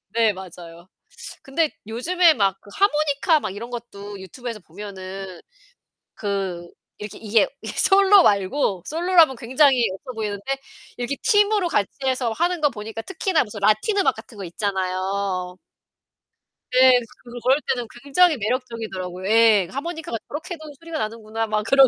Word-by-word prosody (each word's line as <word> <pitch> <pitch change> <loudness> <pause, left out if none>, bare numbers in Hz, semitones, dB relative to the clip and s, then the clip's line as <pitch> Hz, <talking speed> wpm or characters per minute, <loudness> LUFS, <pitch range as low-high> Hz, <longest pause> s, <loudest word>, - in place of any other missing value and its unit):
네, 225 -2 +4
맞아요. 175 -2 -11 0.6
근데 305 +3 0 0.2
요즘에 325 +10 +3
막 195 -5 +1
그 205 - -16
하모니카 305 -3 +2
막 190 - -4
이런 230 +4 -7
것도 205 -4 -8
유튜브에서 230 +4 -7
보면은 190 0 -8 0.8
그 195 -4 -3 0.3
이렇게 210 -1 -8
이게 220 -1 +2
이게 - - -6
솔로 395 -1 +6
말고 200 - +1
솔로라면 335 -3 +4
굉장히 255 +1 +3
없어 250 +7 -8
보이는데 210 -3 -4 0.5
이렇게 245 +3 -2
팀으로 415 -3 +3
같이 210 - +1 0.2
해서 255 -3 0
하는 345 +6 0
거 295 - +4
보니까 225 -1 -7
특히나 375 - 0
무슨 210 0 -9
라틴 215 - +2
음악 395 - +3
같은 225 - -13
거 200 - -6
있잖아요. 185 0 -2 1.2
네, 255 0 +7 0.4
그럴 265 +4 +3
때는 245 -2 -4 0.2
굉장히 315 +3 +4
매력적이더라고요. 215 -6 -4
예, 220 -4 +5
그 - - -14
하모니카가 320 -4 -4
저렇게도 315 +2 -6 0.2
소리가 330 -1 -6
나는구나 220 0 -3
막 215 0 0
그러고. 270 +4 +6
230 Hz, 335 characters per minute, -23 LUFS, 200-295 Hz, 1.2 s, 네